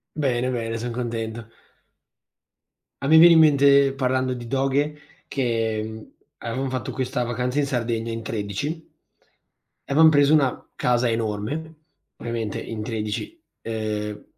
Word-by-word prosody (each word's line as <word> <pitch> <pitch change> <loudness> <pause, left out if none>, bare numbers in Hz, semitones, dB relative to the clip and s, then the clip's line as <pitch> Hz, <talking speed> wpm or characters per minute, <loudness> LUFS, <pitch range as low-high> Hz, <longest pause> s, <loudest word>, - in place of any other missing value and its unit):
Bene, 130 -4 0
bene, 115 -2 -3
son 120 +1 -4
contento. 115 -2 -4 1.5
A 135 - -3
me 160 +3 +7
viene 170 +1 +9
in - - +6
mente, 140 -2 +5
parlando 130 -1 0
di 120 -1 -8
doghe, 140 +3 0 0.3
che 110 -4 -2 0.3
avevam 130 +4 -3
fatto 130 -3 -3
questa 125 -1 -2
vacanza 125 +3 -1
in 145 - 0
Sardegna, 115 -3 -2
in 115 0 -4
13 115 - -3 1.1
e - - -3
avevamo 160 +2 +7
preso 145 0 +4
una 140 -5 +1
casa 125 0 +1
enorme, 115 +9 -3 0.4
ovviamente, 115 -3 -4
in 110 -2 -6
13. 110 - -4 0.2
Ehm, 105 -2 -4
125 Hz, 130 wpm, -23 LUFS, 115-140 Hz, 1.5 s, viene